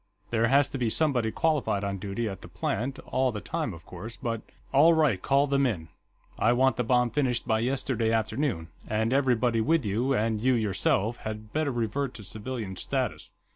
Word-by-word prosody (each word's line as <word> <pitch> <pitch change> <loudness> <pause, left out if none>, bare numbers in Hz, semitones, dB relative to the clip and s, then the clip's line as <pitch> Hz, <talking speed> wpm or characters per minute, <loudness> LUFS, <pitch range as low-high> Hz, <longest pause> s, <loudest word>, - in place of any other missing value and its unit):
There 115 0 +3
has 140 +3 +4
to 135 - -4
be 120 -2 +1
somebody 125 -4 +1
qualified 140 -7 0
on 100 -1 -2
duty 100 +4 -3
at 95 -2 -6
the - - -10
plant, 115 +10 -2
all 130 0 +1
the 105 - -4
time, 160 +1 -3
of 80 -3 -11
course, 110 +6 -8
but...." 115 -2 -3 0.3
"All 160 +5 +6
right, 140 -12 +2
call 140 +1 +3
them 140 -1 +2
in. 85 -9 -3 0.5
I 115 +2 +4
want 130 +2 +3
the 125 - +1
bomb 125 0 +2
finished 125 -3 0
by 110 0 +2
yesterday 120 -2 0
afternoon. 110 - -1 0.2
And 110 +3 0
everybody 125 -4 +2
with 160 +3 +2
you, 115 +7 +1
and 110 -1 0
you, 130 +1 +3
yourself, 110 +1 +1
had 110 0 -7
better 155 -2 +1
revert 120 +3 -2
to 105 - -9
civilian 105 0 -5
status. - - -2
120 Hz, 190 wpm, -28 LUFS, 110-135 Hz, 0.5 s, All